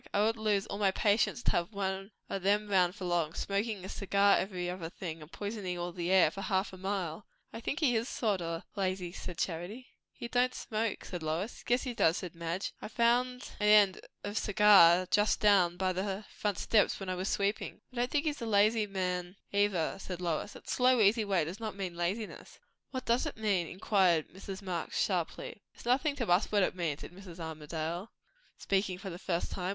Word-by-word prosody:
I 200 - +4
would 225 +1 +2
lose 210 -3 +1
all 200 - -5
my 200 -2 +4
patience 210 +4 +1
to - - +2
have 175 +5 -1
one 195 0 -3 0.2
o' 195 - -3
them 205 +3 +2
round 180 -1 +3
for 185 - -6
long, 170 -2 0
smokin' 200 -1 -2
a - - -5
cigar 200 +1 +3
every 185 -2 -2
other 175 -2 -4
thing, 165 -3 -6
and 150 +2 -12
poisonin' 200 -4 -4
all 175 0 -3
the 175 0 -3
air 185 -5 +5
for 195 - -7
half 190 -1 0
a - - -8
mile." 190 -2 -3 0.3
"I 225 - -5
think 285 +7 -3
he 255 -6 +3
is 225 +3 0
sort 205 -6 0
o' 165 0 -4
lazy," 185 -3 -1
said 180 -1 -7
Charity. 185 +10 -4 0.2
"He 235 - -7
don't 250 +1 +1
smoke," 220 -1 -2
said 180 -2 -5
Lois. 160 +8 -3
"Yes 245 +1 +2
he 250 - -3
does," 170 -7 +3
said 180 -3 -6
Madge. 170 +3 -3
"I - - -5
found 245 +3 +1
an 210 - +2
end 205 -3 +6 0.2
of 205 +1 -2
cigar 195 -4 +6
just 210 0 +3
down 185 -4 +4
by 185 0 +1
the 195 +2 -3
front 205 -3 -1
steps, 215 -3 +2
when 195 - -6
I 185 - -1
was 185 +2 -2
sweeping." 200 +1 -1
"I - - -11
don't 245 +1 +1
think 295 +3 0
he's 295 -3 -1
a 230 - -3
lazy 215 +1 +3
man, 180 -2 -2 0.2
either," 200 -5 +1
said 180 -2 -6
Lois. 175 +3 -2
"That - - -14
slow, 250 0 +3
easy 215 +1 +4
way 190 -6 +1
does 175 +6 -6
not 215 -3 -4
mean 185 -3 -4
laziness." 190 +6 -4 0.3
"What 260 -1 -5
does 235 +2 +2
it - - -6
mean?" 200 -6 +1
inquired 185 -4 +2
Mrs. 195 +2 -8
Marx 180 -3 -3
sharply. 180 +1 -2
"It - - -14
is - - -14
nothing 275 +4 +2
to 240 -5 -2
us 180 +4 +3
what 205 -2 +4
it - - +1
means," 165 -5 -2
said - - -8
Mrs. 180 -2 -11
Armadale, 160 +4 -4 0.5
speaking 195 -2 0
for 195 0 -7
the 170 - -8
first 175 -2 -2
time. 180 -1 -3
195 Hz, 215 wpm, -31 LUFS, 180-215 Hz, 0.5 s, end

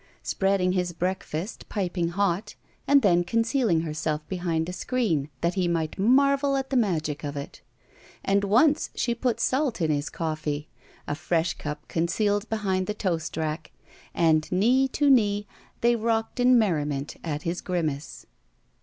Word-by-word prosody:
Spreading 195 -2 +1
his 180 -1 -1
breakfast 180 +1 -4
piping 180 -4 -1
hot, 190 +1 -1 0.3
and 280 -2 +5
then 175 -3 +4
con 225 +6 +1
cealing 225 - +1
herself 155 -1 -3
behind 170 -3 -1
a 180 - -4
screen, 185 - -1
that 170 +1 +1
he 185 -2 0
might 165 0 -2
marvel 275 +5 +3
at 270 0 -4
the - - 0
magic 160 - 0
of 145 -1 -4
it. 140 - -7 0.6
And 200 +1 +2
once 265 +10 +3
she 240 - 0
put 240 0 -1
salt 265 -4 0
in 160 -3 +1
his 145 0 -1
coffee, 155 -2 -3 0.4
a - - -1
fresh 165 +1 0
cup 150 0 -7
concealed 205 +5 0
behind 190 -4 -1
the 210 - -2
toast 170 -7 -2
rack, 155 0 -3 0.4
and 155 -2 +2
knee 245 +9 +3
to 290 +2 0
knee 205 -5 +3 0.4
they 235 0 +4
rocked 225 +1 -1
in 250 0 +6
merriment 150 -9 0
at 150 -2 -3
his 170 +1 -2
grimace. 155 -6 -3
180 Hz, 155 wpm, -26 LUFS, 160-225 Hz, 0.6 s, in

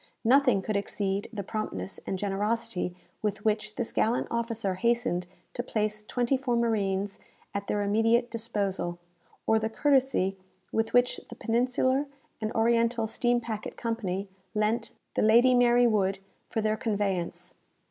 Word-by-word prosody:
Nothing 255 -5 +5
could 215 - -2
exceed 200 0 -1
the 210 -4 -4
promptness 175 - -4
and 190 - -1
generosity 205 -1 -1 0.3
with 205 -1 -2
which 215 0 0
this 240 -3 -3
gallant 230 +3 +1
officer 230 -4 -1
hastened 235 -4 +1 0.3
to - - -2
place 215 -3 -1
twenty 245 +4 +1
four 255 -2 0
marines 205 -4 0 0.3
at 200 0 -3
their 205 0 0
immediate 225 +4 +2
disposal; 200 -6 -2 0.5
or 220 0 +4
the 220 0 -1
courtesy 260 -7 +2 0.3
with 225 0 0
which 245 0 +4
the - - -8
Peninsular 255 +4 +1 0.3
and 215 0 -1
Oriental 230 0 +2
Steam 240 +2 +1
Packet 225 -3 -5
Company 205 -5 -2 0.3
lent 220 +2 +1 0.2
the - - +1
"Lady 235 +4 +6
Mary 245 0 +5
Wood" 195 -4 +2 0.3
for 220 - -1
their 215 0 +1
conveyance. 200 -6 -2
220 Hz, 140 wpm, -28 LUFS, 200-235 Hz, 0.5 s, Lady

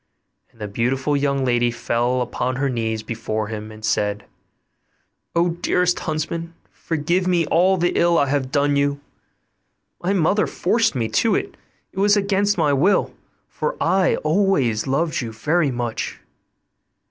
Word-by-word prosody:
And - - -27
the 105 - -4
beautiful 130 +7 0
young 140 -1 0
lady 120 -1 +2
fell 120 +1 -1
upon 125 +1 -2
her 140 +1 0
knees 110 -2 -2
before 110 -1 -3
him, 110 0 -6
and 110 0 -8
said, 105 -1 -1 1.1
'O 170 +1 +3
dearest 180 +1 0
huntsman! 165 +1 -4 0.2
forgive 170 +3 -1
me 175 -2 +2
all 185 +5 +3
the 175 0 +1
ill 170 0 +3
I 145 - +3
have 135 -2 -1
done 145 -1 +2
you; 140 0 +1 1.0
my 185 +3 0
mother 195 +3 +2
forced 225 -9 +1
me 115 -3 0
to 230 - +2
it, 400 0 -3 0.4
it 190 - -7
was 205 +1 +4
against 200 0 +1
my 150 -4 +2
will, 170 +9 +2 0.3
for - - -3
I 190 -1 +2
always 155 - +1
loved 155 +4 0
you 115 -2 -5
very 150 +8 +1
much. 120 -3 -4
145 Hz, 150 wpm, -21 LUFS, 120-175 Hz, 1.1 s, was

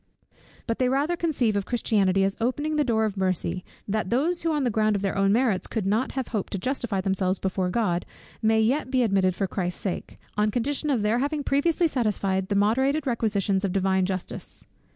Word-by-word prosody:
But 230 - -2
they 255 -1 +2
rather 285 +6 +1
conceive 270 -11 0
of 200 -2 -1
Christianity 200 -5 +2
as 195 0 0
opening 290 +6 0
the 300 - +3
door 225 -4 +1
of 205 -2 -3
mercy, 185 -1 -1 0.2
that 210 -2 -1
those 315 +9 +1
who 330 - 0
on 300 -2 0
the 245 - +1
ground 215 0 +2
of 200 - -2
their 195 - -1
own 195 0 +3
merits 225 -4 +1
could 220 -4 -3
not 215 +6 0
have 265 -2 -3
hoped 210 -5 -3
to - - 0
justify 230 -2 -1
themselves 190 0 0
before 190 -1 -1
God, 180 -4 0 0.4
may 220 0 +3
yet 260 +5 +1
be 255 -1 +2
admitted 190 -4 +2
for 195 - 0
Christ's 180 -2 -3
sake, 190 - -4 0.2
on 210 0 +2
condition 275 +7 -1
of 245 -7 +1
their 220 +3 +2
having 290 +2 -1
previously 325 +5 +2
satisfied 200 -8 -1
the 200 - 0
moderated 265 +9 +2
requisitions 210 -5 0
of 195 - 0
Divine 190 -1 +2
Justice. 185 -2 -6
215 Hz, 205 wpm, -25 LUFS, 195-260 Hz, 0.4 s, the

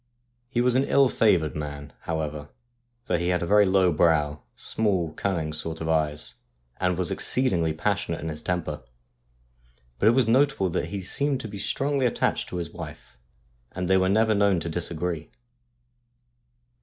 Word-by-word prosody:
He 120 -2 0
was 125 0 +3
an 130 - +4
ill 140 -2 +4
favoured 90 -11 +2
man, 75 -1 -6 0.2
however, 75 -2 -3 0.5
for 85 - 0
he 85 - -1
had 90 -1 +1
a 105 +4 +5
low 95 -1 +4
brow, 75 -2 +2
small, 95 -8 -1
cunning 80 -5 -2
sort 80 +1 -3
of 80 - -4
eyes, 75 -5 0 0.4
and 90 -1 0
was 90 -2 +1
exceedingly 90 -11 +1
passionate 80 - -1
in 80 - -4
his 75 0 -6
temper. 90 -2 -3 1.2
But 105 - +3
it 115 - +6
was 130 -4 +3
notable 130 - +3
that - - -1
he 100 -2 -5
seemed 140 +8 0
to 115 - -6
be 100 -1 -8
strongly 135 +1 0
attached 115 - -1
to - - -6
his 85 -2 -4
wife, 75 -7 -10 0.5
and 90 0 -3
they 95 +1 +4
were 95 0 +2
never 110 +2 +3
known 100 -3 +3
to 85 - -4
disagree. 85 -1 -3
90 Hz, 165 wpm, -26 LUFS, 80-105 Hz, 1.2 s, it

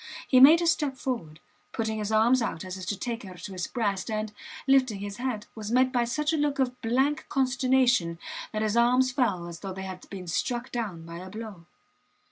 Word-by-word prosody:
He 255 - +5
made 315 +6 +8
a - - +1
step 295 -5 +1
forward, 170 - -4 0.3
putting 220 -1 -2
his 210 0 -3
arms 235 +4 +4
out, 190 -6 -3
as 185 0 -5
if 185 -1 -7
to 205 - -1
take 235 +1 -4
her 185 -3 -10
to 195 - -8
his 180 -2 -3
breast, 205 -3 -1
and, 215 -1 -2 0.3
lifting 260 -5 +3
his 200 0 -6
head, 245 -4 -3
was 215 -1 -6
met 255 +1 +4
by 240 -1 +2
such 300 +6 -1
a - - +1
look 290 -1 0
of 250 -2 -1
blank 265 +6 +1
consternation 255 - +2 0.3
that 215 0 -1
his 215 0 0
arms 250 +2 +4
fell 235 -9 0
as 170 -1 -8
though 195 -2 -5
they 190 +1 -6
had 185 -1 -8
been 190 -2 -7
struck 240 +8 -2
down 200 -9 -4
by 170 0 -8
a 185 +1 -8
blow. 210 -5 -8
230 Hz, 215 wpm, -27 LUFS, 190-255 Hz, 0.3 s, made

